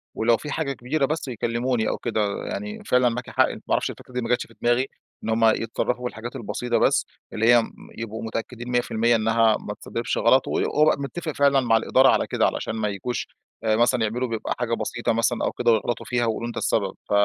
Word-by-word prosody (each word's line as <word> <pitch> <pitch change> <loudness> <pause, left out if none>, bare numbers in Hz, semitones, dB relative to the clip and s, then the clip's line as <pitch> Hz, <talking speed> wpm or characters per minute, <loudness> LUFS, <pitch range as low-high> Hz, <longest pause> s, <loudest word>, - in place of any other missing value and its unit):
ولو 115 0 +3
في 150 - -7
حاجة 140 -3 -1
كبيرة 135 +4 -1
بس 155 +1 -3
يكلموني 120 -1 -1
أو - - -2
كده، 105 -4 -2
يعني، 210 +1 -5
فعلًا 125 -7 +3
معاكِ 120 +2 -5
حق، - - +3
ما - - -7
أعرفش - - +2
الفكرة 125 - -14
دي 125 - -1
ما 115 - -4
جاتش 125 0 +1
في - - -19
دماغي، 120 +2 +2 0.4
إن 110 - -3
همّ 115 0 +3
يتصرفوا 115 +2 +1
في 125 - -1
الحاجات 115 +2 -8
البسيطة 120 +3 -2
بس، - - +3 0.3
اللي 110 +2 +1
هيّ 120 - +6
م - - -7 0.3
يبقوا 115 0 -5
متأكّدين 115 +2 -5
100% 120 -1 +2
إن 110 -1 0
هي 115 -1 +4
ما - - -6
تسببش - - -3
غلط، - - +4
و - - -3
وأبقى 150 -1 +2
متّفق 155 +3 -4
فعلًا 140 -1 +3
مع 115 -3 +3
الإدارة 130 +4 +4
على - - +2
كده - - +1
علشان - - -1
ما 110 -1 -1
ييجوش 105 +5 -3 0.4
آآ 110 -1 +2
مثلًا 120 +2 +3
يعملوا 120 +4 -1
بيبقى 115 -2 -3
حاجة 120 -1 -1
بسيطة 115 0 -1
مثلًا 115 +1 +1
أو - - 0
كده 120 -1 +2
ويغلطوا 115 +1 0
فيها 120 -1 0
ويقولوا 115 +1 -2
أنت 120 - -6
السبب. 100 -4 0 0.2
ف - - -9
120 Hz, 225 wpm, -24 LUFS, 115-125 Hz, 0.4 s, هيّ